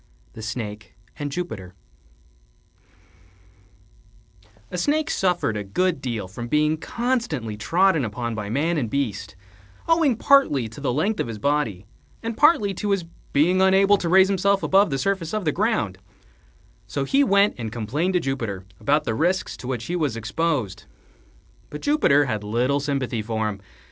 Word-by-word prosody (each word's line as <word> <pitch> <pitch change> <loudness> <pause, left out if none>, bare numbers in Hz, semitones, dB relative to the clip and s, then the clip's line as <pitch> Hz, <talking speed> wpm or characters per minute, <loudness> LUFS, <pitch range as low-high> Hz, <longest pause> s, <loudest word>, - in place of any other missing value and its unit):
THE 110 - -9
SNAKE 110 -3 -6 0.2
AND 145 -1 -3
JUPITER 110 - -5 3.0
A - - -3
Snake 305 - +1
suffered 180 - 0
a 105 - -3
good 160 - 0
deal 115 -7 -3
from 120 +6 -7
being 150 +3 +2
constantly 225 - -2
trodden 165 - +2
upon 115 +1 -3
by 105 -2 -5
man 155 +7 0
and 120 -5 -2
beast, 110 -6 -3 0.5
owing 330 -6 +3
partly 220 - +3
to 110 +6 -11
the 135 - 0
length 190 - 0
of - - -1
his 115 -2 -5
body 115 -7 -1 0.4
and 230 0 -3
partly 225 -9 +4
to 205 +3 -3
his 195 -4 0 0.3
being 175 +6 +3
unable 195 +1 +5
to 170 - -3
raise 190 +2 +6
himself 195 +1 +1
above 195 0 +4
the 135 - -1
surface 190 +3 -1
of 210 -4 -2
the 150 - +2
ground: 170 - -1 0.9
so 140 - -2
he 275 - +3
went 200 -4 +4
and 110 -2 -4
complained 130 - -1
to - - +4
Jupiter 115 - -3
about 145 +2 +2
the 110 - -2
risks 175 +10 0
to 125 - -9
which 125 -3 -3
he 175 - -3
was 145 -9 -1
exposed. 115 - -2 0.8
But 150 - -7
Jupiter 215 - +3
had 110 -5 -3
little 125 +7 +1
sympathy 135 -5 -2
for 110 0 -2
him. 100 -1 -7
145 Hz, 160 wpm, -23 LUFS, 115-190 Hz, 3.0 s, raise